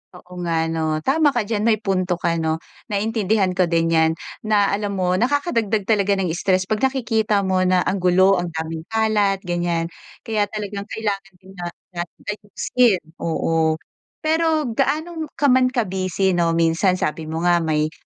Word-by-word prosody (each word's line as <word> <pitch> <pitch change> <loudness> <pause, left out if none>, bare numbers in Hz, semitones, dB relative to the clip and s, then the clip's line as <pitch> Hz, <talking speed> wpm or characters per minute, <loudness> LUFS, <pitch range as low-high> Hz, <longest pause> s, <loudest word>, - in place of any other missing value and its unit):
Oo 180 0 -11
nga 165 -2 0
'no. 155 -1 -1
Tama 290 0 +3
ka 240 - +2
diyan. 210 +1 -1
May 220 -2 +3
punto 185 -2 0
ka 170 -1 -1
'no, 160 0 -1 0.2
naintindihan 210 -2 +1
ko 180 -1 +1
din 165 0 +1
'yan 160 -1 +4 0.4
na 205 -2 +3
alam 200 0 -2
mo 185 -1 +1
nakakadagdag 235 - +1
talaga 200 -1 +2
ng 185 -4 -1
stress 185 +2 +1
'pag 210 +3 -2
nakikita 225 -6 +1
mo 190 -1 +1
na 180 -1 +3
ang 195 - -1
gulo, 185 +1 +4
ang 175 - -2
daming 160 0 -5
kalat, 210 -3 +1
ganyan. 175 -1 -1 0.3
Kaya 215 -2 0
talagang 205 -1 -5
kailangan 200 -3 -3
din 190 - -14
na 175 - -3 0.2
natin 175 -1 -7
ayusin, 210 0 0 0.2
oo. 160 -1 +1 0.5
Pero 320 0 +2
gaano 315 +6 -1
ka 285 -2 +3
man 255 0 +5
ka-busy 190 -6 0
'no, 170 -2 +1
minsan 165 +3 +2
sabi 160 -2 -3
mo 160 +2 -3
nga 175 -1 +4
may, 155 -1 0
195 Hz, 165 wpm, -21 LUFS, 175-220 Hz, 0.5 s, man